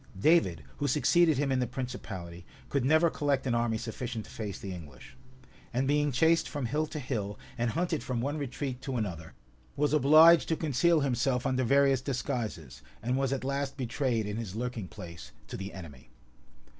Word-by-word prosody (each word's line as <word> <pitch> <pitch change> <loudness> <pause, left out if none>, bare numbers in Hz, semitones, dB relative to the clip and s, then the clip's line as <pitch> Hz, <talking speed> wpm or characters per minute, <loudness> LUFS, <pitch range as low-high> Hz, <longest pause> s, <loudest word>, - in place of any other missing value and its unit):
[] - - -11
David, 170 0 +3
who 145 - -1
succeeded 155 +3 +4
him 140 -1 0
in 130 - +2
the 125 - 0
principality, 95 -9 -6 0.3
could 140 -3 0
never 155 +5 +4
collect 140 -2 0
an 125 - 0
army 115 -1 +1
sufficient 115 0 -5
to - - -14
face 105 -3 -5
the 95 -2 -6
English; 75 -7 -11 0.6
and 130 +2 0
being 145 +1 +2
chased 160 +5 +3
from 145 -4 -3
hill 150 +6 0
to 155 - -7
hill, 110 -7 -3 0.2
and 120 -1 0
hunted 165 +3 -1
from 125 -2 -2
one 145 +5 -2
retreat 135 -2 -4
to 130 -2 -3
another, 85 -7 -4 0.4
was 150 +1 +1
obliged 155 +3 +7
to 160 - +1
conceal 160 +2 +2
himself 130 -1 0
under 130 0 +1
various 135 +1 +4
disguises, 120 - -4 0.2
and 125 +2 0
was 135 -1 0
at 135 -2 -2
last 140 +1 -2
betrayed 125 -3 -1
in 105 +1 -4
his 110 -4 -5
lurking 120 -4 -3
place 85 -2 -10
to - - -7
the 95 0 -5
enemy. 75 -9 -11
130 Hz, 185 wpm, -30 LUFS, 115-145 Hz, 0.6 s, obliged